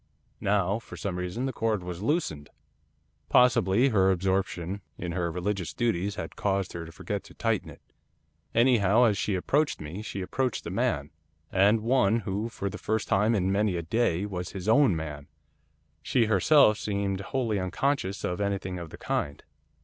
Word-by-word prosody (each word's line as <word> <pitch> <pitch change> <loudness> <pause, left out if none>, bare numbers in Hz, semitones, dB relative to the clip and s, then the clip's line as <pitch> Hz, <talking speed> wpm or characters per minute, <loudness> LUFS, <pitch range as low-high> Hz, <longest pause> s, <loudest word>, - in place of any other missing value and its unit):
Now, 100 +1 +1
for - - -11
some 95 -4 -3
reason, 90 +8 -3
the 135 - -2
cord 110 -4 -1
was 90 0 -6
loosed. 105 - -1 0.8
Possibly 125 0 +4
her 95 -5 +3
absorption 95 0 -1 0.2
in 85 -1 -4
her 85 -1 -1
religious 90 +1 -3
duties 100 -4 0
had - - -6
caused 100 -2 -1
her 85 -1 -6
to - - -10
forget 100 +4 -4
to - - -15
tighten 115 -3 -1
it. - - -14 0.7
Anyhow, 115 -2 +4
as 110 -4 +4
she 100 0 -1
approached 145 +11 +1
me, 80 +7 -6
she 100 -2 -5
approached 125 +6 -2
a - - -4
man, 70 0 -1 0.4
and 100 +3 +4
one 115 -2 +2
who, 105 +2 -3
for 100 - -4
the - - -5
first 110 0 -1
time 105 +4 +3
for 100 - +1
many 100 +1 +1
a 85 - -3
day, 95 -1 +1
was 90 -3 -5
his 95 -1 -6
own 120 - +5
man. 75 -3 -6 0.7
She 120 -3 +2
herself 110 +2 +5
seemed 100 -2 -2
wholly 110 0 -1
unconscious 95 +1 -1
of 90 +3 -2
anything 95 -2 -2
of 85 -2 -7
the - - -10
kind. 70 - -3
100 Hz, 170 wpm, -28 LUFS, 90-115 Hz, 0.8 s, own